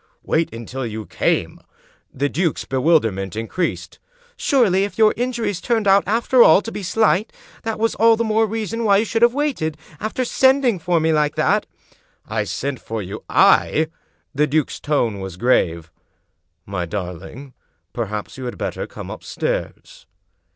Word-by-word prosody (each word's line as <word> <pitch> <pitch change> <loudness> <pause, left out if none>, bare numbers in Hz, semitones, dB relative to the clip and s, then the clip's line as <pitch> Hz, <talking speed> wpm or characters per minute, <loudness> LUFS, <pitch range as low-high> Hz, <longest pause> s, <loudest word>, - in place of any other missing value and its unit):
" - - -47
Wait 165 +1 +2
until 120 +3 -6
you 110 -2 -5
came? - - -1 0.3
" - - -35
The 140 +2 -1
duke's 165 +2 -1
bewilderment 120 - +1
increased. 115 +11 -3 0.2
" 485 0 -31
Surely, 210 - +2
if 200 -2 -4
your 215 -1 +5
injuries 235 -7 -2
turned 225 -2 0
out, 195 0 +5
after 235 +4 +3
all, 190 -1 +7
to 225 - -6
be 210 - -5
slight, 215 +1 +1 0.3
that 225 -1 -3
was 225 +1 +1
all 230 +1 +5
the 230 - -1
more 220 0 +2
reason 225 +1 -3
why 200 -3 +4
you 215 - +1
should 225 +1 -1
have 240 +1 +5
waited, 260 - -1 0.2
after 220 +4 -2
sending 260 -5 +3
for 170 0 +1
me 160 0 +2
like 150 -1 +1
that." - - +1 0.3
" - - -39
I - - -1
sent 140 -1 -3
for 110 -2 -4
you 95 +4 -8
— - - -50 0.3
I? 160 0 -1 0.2
" - - -45
The 150 +2 +2
duke's 150 0 -1
tone 120 -9 0
was 95 -2 -7
grave. 85 -8 +1 0.4
" 85 0 -51
My 90 -2 -2
darling, 95 - -7 0.4
perhaps 105 +1 -5
you 130 - -5
had 120 - -5
better - - -4
come - - -9
upstairs." - - -5
165 Hz, 180 wpm, -20 LUFS, -, 0.4 s, all